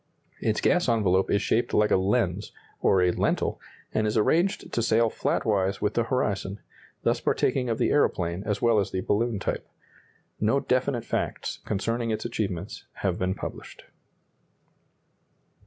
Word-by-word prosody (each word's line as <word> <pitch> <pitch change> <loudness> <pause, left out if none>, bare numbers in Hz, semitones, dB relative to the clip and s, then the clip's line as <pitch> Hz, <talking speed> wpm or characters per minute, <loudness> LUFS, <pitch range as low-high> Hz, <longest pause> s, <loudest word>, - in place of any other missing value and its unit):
Its - - 0
gas - - +3
envelope 95 -5 +2
is 100 - +2
shaped 120 - +1
like 105 0 +3
a - - +6
lens, 100 0 0 0.3
or 95 -2 +3
a 90 - +3
lentil, - - 0 0.3
and 110 0 +1
is 105 - 0
arranged 170 - +1
to 115 - +1
sail 115 0 +3
flatwise 100 -3 0
with 105 0 0
the 115 - +1
horizon, 105 -5 -1 0.4
thus - - +2
partaking 125 -2 +1
of 115 - 0
the - - +1
aeroplane 90 -10 +1
as 105 0 -2
well 115 -2 +4
as 100 - 0
the 95 - -2
balloon 115 +3 0
type. - - -3 0.7
No 110 +6 +2
definite 130 -2 0
facts - - -3
concerning 115 +3 -1
its 110 +1 -2
achievements 100 -5 -4
have - - -2
been 95 +1 0
published. - - -8
105 Hz, 155 wpm, -26 LUFS, 95-115 Hz, 0.7 s, a